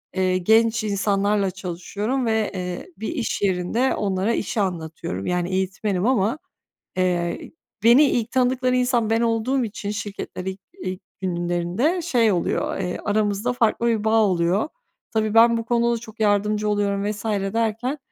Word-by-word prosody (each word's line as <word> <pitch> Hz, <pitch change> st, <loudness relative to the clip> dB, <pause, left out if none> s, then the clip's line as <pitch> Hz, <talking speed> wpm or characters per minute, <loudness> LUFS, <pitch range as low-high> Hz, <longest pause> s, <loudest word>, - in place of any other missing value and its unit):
eee, 185 Hz, -1 st, +2 dB
genç 225 Hz, +4 st, +3 dB
insanlarla 200 Hz, -1 st, +1 dB
çalışıyorum 200 Hz, +7 st, -3 dB
ve, 220 Hz, -2 st, +1 dB
eee, 180 Hz, -, -4 dB
bir 220 Hz, -, -4 dB
iş 270 Hz, -9 st, -2 dB
yerinde 200 Hz, +6 st, +1 dB
onlara 195 Hz, +2 st, 0 dB
işi 215 Hz, 0 st, -1 dB
anlatıyorum, 160 Hz, -, -4 dB
yani 180 Hz, 0 st, -1 dB
eğitmenim 190 Hz, +1 st, -1 dB
ama, 235 Hz, +1 st, +2 dB, 0.6 s
eee, 175 Hz, -2 st, 0 dB
ı -, -, -22 dB, 0.3 s
beni 240 Hz, +6 st, +7 dB
ilk 240 Hz, -4 st, 0 dB
tanıdıkları 255 Hz, 0 st, +2 dB
insan 245 Hz, -3 st, +1 dB
ben 225 Hz, 0 st, +2 dB
olduğum 235 Hz, +3 st, +1 dB
için 205 Hz, -1 st, -5 dB
şirkette 205 Hz, -3 st, -5 dB
ilk 190 Hz, +1 st, -5 dB, 0.2 s
ilk 185 Hz, 0 st, -4 dB, 0.2 s
günlerinde 175 Hz, -, 0 dB
şey 230 Hz, -8 st, +3 dB
oluyor, 175 Hz, -, -1 dB
eee, 180 Hz, -2 st, -3 dB
aramızda 210 Hz, +2 st, 0 dB
farklı 235 Hz, -1 st, +1 dB
bir 225 Hz, -3 st, +1 dB
bağ 220 Hz, 0 st, +4 dB
oluyor. 185 Hz, -, +1 dB, 0.4 s
Tabii, 215 Hz, -1 st, 0 dB
ben 230 Hz, +1 st, +6 dB
bu 230 Hz, -, -3 dB
konuda 235 Hz, 0 st, +2 dB
da -, -, -2 dB
çok 225 Hz, -1 st, -13 dB
yardımcı 210 Hz, 0 st, +2 dB
oluyorum 200 Hz, -1 st, 0 dB
vs. 210 Hz, 0 st, -6 dB, 0.3 s
derken, 230 Hz, +5 st, -1 dB
210 Hz, 150 wpm, -23 LUFS, 190-230 Hz, 0.6 s, beni